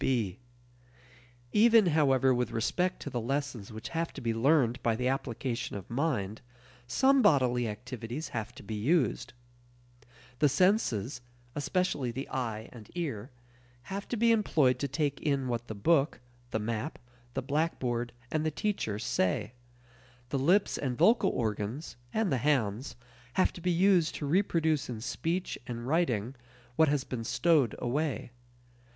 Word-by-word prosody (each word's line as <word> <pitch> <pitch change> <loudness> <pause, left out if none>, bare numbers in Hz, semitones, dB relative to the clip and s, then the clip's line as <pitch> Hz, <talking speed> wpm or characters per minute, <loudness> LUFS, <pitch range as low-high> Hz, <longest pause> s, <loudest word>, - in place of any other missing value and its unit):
(b) 110 -7 0 1.1
Even, 225 0 +6
however, 135 -5 +4
with 125 0 0
respect 180 +11 0
to 145 - -5
the 120 - -2
lessons 130 -4 -3
which 110 +2 -7
have 165 0 -2
to - - -7
be 115 -2 -1
learned 125 0 +3
by 115 -1 +1
the 125 +2 -1
application 130 -3 -2
of 100 - -7
"mind," 115 -7 -1 0.5
some 265 - +4
bodily 125 - +3
activities 120 +6 -6
have 115 0 -4
to - - -11
be 110 - -6
used. 125 - +1 1.1
The 150 - +5
senses 145 - +1 0.3
especially 145 -3 0
the 130 +4 -5
eye 115 -4 -3
and 110 -4 -12
ear 135 -10 -3 0.6
have 200 +1 -4
to 240 - -2
be 230 +1 +4
employed 150 - +3
to 140 - -1
take 145 0 -1
in 140 -3 0
what 120 -1 -2
the 110 - -5
book, 145 +7 +2 0.3
the - - -1
map, 110 +6 -3 0.4
the - - -1
blackboard, 130 -5 -1 0.2
and 155 -1 0
the 155 - +1
teacher 155 - -2
say. 105 +1 0 0.8
The 135 - 0
lips 180 +9 +3
and 125 -4 -2
vocal 230 - +5
organs, 110 +6 -3 0.2
and 220 -4 0
the 130 - +1
hands, 125 -3 0 0.4
have 185 - +2
to 175 - -10
be 180 - 0
used 180 -1 +3
to 150 - -4
reproduce 160 -3 +1
in 115 -3 -4
speech 170 +10 -2
and 120 -1 -5
writing 130 -7 +1 0.4
what 160 +1 +5
has 145 -2 +1
been 120 -3 -5
stowed 140 0 +2
away. 135 0 -2
135 Hz, 150 wpm, -30 LUFS, 115-160 Hz, 1.1 s, Even